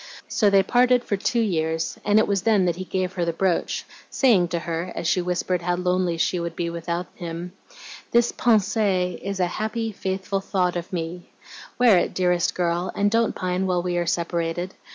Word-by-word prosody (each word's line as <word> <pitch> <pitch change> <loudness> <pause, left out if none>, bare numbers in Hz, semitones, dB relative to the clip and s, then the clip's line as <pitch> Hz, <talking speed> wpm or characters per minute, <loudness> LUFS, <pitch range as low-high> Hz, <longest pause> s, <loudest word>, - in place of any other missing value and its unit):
So 210 - +2
they 195 -1 +5
parted 245 +3 +3
for 205 - -1
two 230 +4 0
years, 160 -5 -1
and 205 0 +3
it 220 - +4
was 200 -2 +1
then 205 -2 +3
that 175 -1 0
he 185 - -5
gave 185 0 -2
her 180 -2 -1
the 170 - 0
brooch, 180 +1 0 0.2
saying 215 -10 +3
to 170 - -2
her, 170 +1 -3
as 170 - -3
she 180 - +2
whispered 180 0 -1
how 175 +1 0
lonely 180 -1 0
she 180 - +1
should 170 -1 -4
be 170 -1 -2
without 170 +1 -3
him, 170 +1 -6 0.6
'This 235 0 +3
PENSEE 205 -5 +1
is 195 0 -4
a 180 - +3
happy, 220 +5 -3
faithful 190 0 -3
THOUGHT 185 -2 0
of 175 0 -5
me. 175 0 -5 0.5
Wear 235 -7 +6
it, - - -2
dearest 180 -1 +1
girl, 175 0 0
and 205 0 +2
don't 230 0 +2
pine 185 +1 -1
while 180 -1 0
we 180 -1 -1
are 175 -1 -1
separated. 170 +1 -2
180 Hz, 195 wpm, -24 LUFS, 175-200 Hz, 0.6 s, Wear